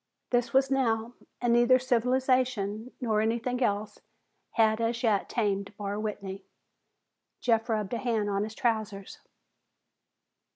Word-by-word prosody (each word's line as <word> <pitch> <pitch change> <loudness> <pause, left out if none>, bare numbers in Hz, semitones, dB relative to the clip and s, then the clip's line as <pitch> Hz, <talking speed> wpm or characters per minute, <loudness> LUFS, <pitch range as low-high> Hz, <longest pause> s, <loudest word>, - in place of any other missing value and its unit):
This 245 -1 +1
was 270 0 +3
now, 235 -3 +1 0.3
and 240 -1 +2
neither 240 +2 +6
civilization 255 -3 +1
nor 220 -4 +1
anything 235 +3 -1
else 205 -2 -1 0.5
had 220 0 +3
as 230 +2 -1
yet 215 -4 +2
tamed 200 -3 -1
Barr 205 0 -3
Whitney. 200 -2 -5 1.0
Jeff 225 -1 +1
rubbed 215 -1 -1
a 235 - -1
hand 225 -4 0
on 200 0 0
his 215 +1 -6
trousers. 215 -4 -2
225 Hz, 125 wpm, -28 LUFS, 210-245 Hz, 1.0 s, neither